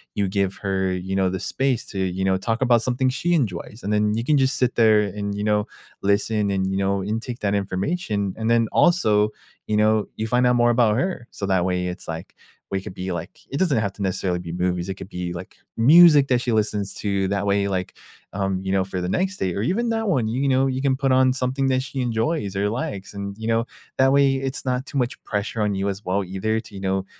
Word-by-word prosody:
you 100 -2 0
give 95 0 0
her, 95 -2 0
you 90 +1 -4
know, 95 -1 +2
the 95 0 -4
space 135 -3 0
to, 100 - -5
you 95 0 -1
know, 95 0 +2
talk 115 +5 -2
about 120 -3 +4
something 130 +1 +1
she 150 +7 0
enjoys, 110 - -2
and 105 - -2
then 105 0 +2
you 115 - -1
can 145 +4 +3
just 135 0 +2
sit 125 -1 +1
there 110 -2 +5
and, 100 0 -3
you 105 - -3
know, 105 0 +1 0.3
listen 100 +1 +1
and, 95 -1 0
you 95 - -1
know, 100 0 0
intake 115 +4 -4
that 100 -1 0
information, 100 - -1
and 110 +1 -1
then 115 -1 +4
also, 110 - +4 0.4
you 105 - 0
know, 110 0 +3
you 110 - -3
find 125 +2 +2
out 125 - +3
more 120 0 +4
about 115 -3 +3
her, 175 -5 -2
so 100 - -4
that 95 -2 +1
way 90 -1 -1
it's 90 0 -6
like 80 0 -6 0.4
we 95 -1 -1
could 90 - -9
be 95 +1 -4
like, 85 +2 -6
it 140 - -2
doesn't 170 -10 +2
have 100 -3 -1
to 105 - -11
necessarily 95 -2 -1
be 85 -1 -7
movies, 90 +1 -1
it 95 - -3
could 95 - -9
be, 90 -1 -4
like, 90 +2 -8 0.2
music 150 +2 +7
that 125 -2 +2
she 120 - -1
listens 105 -2 0
to, 100 -2 -1
that 100 +1 -1
way, 100 0 +1
like, 95 -2 -2 0.4
um, 95 -1 -1
you 95 - -2
know, 95 -1 +2
for 95 -1 -4
the 90 - -2
next 190 - -1
date 90 -2 -1
or 100 - -1
even 220 - 0
that 225 -1 -1
one, 130 - +1
you 130 +5 0
know, 135 0 +3
you 130 0 -1
can 135 -2 +2
put 135 0 0
on 130 0 +4
something 130 +1 -1
that 130 -1 +1
she 135 0 -4
enjoys 115 - -1
or 100 +1 +1
likes, 100 -4 -4
and, 100 0 -6
you 110 0 -5
know, 115 0 +1 0.3
that 135 0 +5
way, 140 -1 +4
it's 135 +1 -3
not 130 +1 -1
too - - -4
much 125 -2 -2
pressure 105 +1 -3
on 105 -1 +1
you 95 +1 -1
as 100 +1 -3
well 95 +2 0
either 95 +4 -1
to, 105 - -12
you 95 - -8
know, 95 0 -1
105 Hz, 245 wpm, -23 LUFS, 95-125 Hz, 0.4 s, music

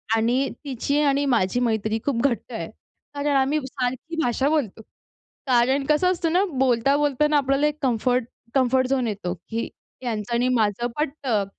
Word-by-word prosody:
आणि 245 +5 +1 0.2
तिची 280 +2 -1
आणि 280 0 +2
माझी 190 +4 +1
मैत्री 220 -2 0
खूप 250 -5 0
घट्ट 235 - -4
आहे - - -4 0.4
कारण 285 0 0
आम्ही 275 +3 +2
सारखी 260 +4 -4
भाषा 260 +4 +1
बोलतो. 255 -9 -1 0.7
कारण 260 +2 +3
कसं 335 +5 +3
असतं 335 -2 -1
ना, 375 +3 +3 0.2
बोलता-बोलताना 280 +4 +2
आपल्याला 275 +2 +2
एक 300 0 -1
कम्फर्ट, 250 0 +1 0.3
कम्फर्ट 260 -1 +3
झोन 260 -3 +1
येतो, 195 -4 -3
की 225 +6 -5 0.4
यांचं 225 0 -3
आणि 245 +2 +2
माझं 220 +1 +1
पटतं. 270 -8 -1
260 Hz, 150 wpm, -23 LUFS, 230-285 Hz, 0.7 s, कारण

